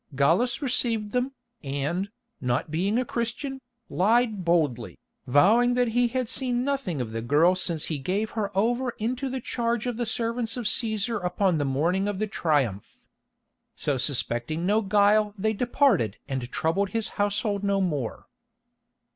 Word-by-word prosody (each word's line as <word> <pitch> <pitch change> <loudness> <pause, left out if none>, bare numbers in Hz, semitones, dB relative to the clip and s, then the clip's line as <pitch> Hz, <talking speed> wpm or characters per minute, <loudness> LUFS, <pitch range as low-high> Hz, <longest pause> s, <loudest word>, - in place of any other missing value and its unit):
Gallus 175 - +2
received 230 -5 +1
them, 250 +3 -1 0.3
and, 145 +8 -2 0.3
not 125 +4 -1
being 190 +7 0
a 255 - +1
Christian, 255 +4 -4 0.3
lied 220 +1 +2
boldly, 155 -9 0 0.3
vowing 220 - +4
that 245 -1 +2
he 245 +2 +2
had 255 0 -2
seen 245 0 -1
nothing 270 - -2
of 120 -3 -3
the 115 0 -3
girl 150 +9 +4
since 170 -4 0
he 155 -3 -3
gave 200 +9 -2
her 215 -3 -2
over 240 +4 +1
into 255 +5 -2
the 260 0 -3
charge 235 -1 -2
of 245 -2 -2
the 240 -1 -2
servants 230 +1 -2
of 240 - -4
Cæsar 220 -1 0
upon 180 -1 +1
the 145 - 0
morning 170 +9 +1
of 205 -2 -2
the 215 - 0
Triumph. 145 - -1 0.7
So 145 -2 -1
suspecting 135 +4 0
no 210 +3 +3
guile 210 +1 +3
they 220 +3 0
departed 230 - +2
and 130 -2 -4
troubled 190 +5 0
his 225 +2 -1
household 205 0 -1
no 200 -1 +1
more. 150 - -2
205 Hz, 155 wpm, -26 LUFS, 160-235 Hz, 0.7 s, vowing